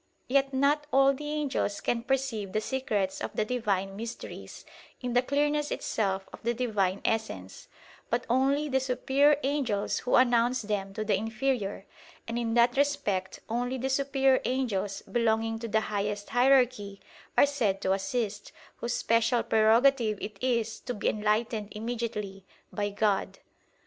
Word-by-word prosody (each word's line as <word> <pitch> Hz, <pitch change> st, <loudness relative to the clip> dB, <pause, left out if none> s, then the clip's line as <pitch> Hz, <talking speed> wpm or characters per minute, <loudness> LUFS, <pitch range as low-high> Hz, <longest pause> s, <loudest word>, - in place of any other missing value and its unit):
Yet 275 Hz, +1 st, +2 dB
not 285 Hz, +3 st, +2 dB
all 270 Hz, +1 st, +5 dB
the 295 Hz, +2 st, -6 dB
angels 285 Hz, -9 st, -1 dB
can 235 Hz, -, -1 dB
perceive 245 Hz, -6 st, -2 dB
the 215 Hz, -, +2 dB
secrets 215 Hz, -7 st, -2 dB
of -, -, -5 dB
the 215 Hz, -, +1 dB
Divine 200 Hz, -5 st, -1 dB
mysteries 230 Hz, +3 st, -8 dB, 0.3 s
in 250 Hz, -1 st, -3 dB
the 245 Hz, -, +4 dB
clearness 295 Hz, +2 st, 0 dB
itself 195 Hz, -3 st, -2 dB
of -, -, -10 dB
the 235 Hz, +1 st, -1 dB
Divine 205 Hz, -6 st, 0 dB
Essence; 100 Hz, -, -3 dB, 0.4 s
but 240 Hz, +2 st, 0 dB
only 275 Hz, +4 st, +2 dB
the 265 Hz, -2 st, +1 dB
superior 270 Hz, +3 st, +3 dB
angels 260 Hz, -8 st, 0 dB
who 250 Hz, -, +1 dB
announce 245 Hz, -1 st, +3 dB
them 205 Hz, -2 st, -2 dB
to 215 Hz, -, -2 dB
the 210 Hz, -, +1 dB
inferior: 220 Hz, -1 st, -2 dB, 0.4 s
and 230 Hz, +1 st, -2 dB
in 230 Hz, -1 st, -1 dB
that 240 Hz, +1 st, +4 dB
respect 275 Hz, -10 st, 0 dB
only 245 Hz, +3 st, -2 dB
the 265 Hz, +2 st, -2 dB
superior 270 Hz, -1 st, +2 dB
angels 210 Hz, -7 st, -1 dB
belonging 225 Hz, -1 st, 0 dB
to 230 Hz, -, -5 dB
the 220 Hz, 0 st, +1 dB
highest 205 Hz, -1 st, -3 dB
hierarchy 245 Hz, -6 st, +3 dB, 0.4 s
are -, -, +8 dB
said 235 Hz, -9 st, 0 dB
to 190 Hz, -, +2 dB
assist, 205 Hz, +1 st, -3 dB, 0.3 s
whose 240 Hz, 0 st, -2 dB
special 230 Hz, +1 st, +2 dB
prerogative 225 Hz, +1 st, +3 dB
it 210 Hz, -2 st, -7 dB
is 230 Hz, -3 st, 0 dB
to 245 Hz, -1 st, -5 dB
be 210 Hz, -, 0 dB
enlightened 215 Hz, 0 st, -1 dB
immediately 220 Hz, -4 st, -4 dB, 0.3 s
by 205 Hz, -1 st, -1 dB
God. 205 Hz, -1 st, 0 dB
235 Hz, 150 wpm, -28 LUFS, 210-265 Hz, 0.4 s, are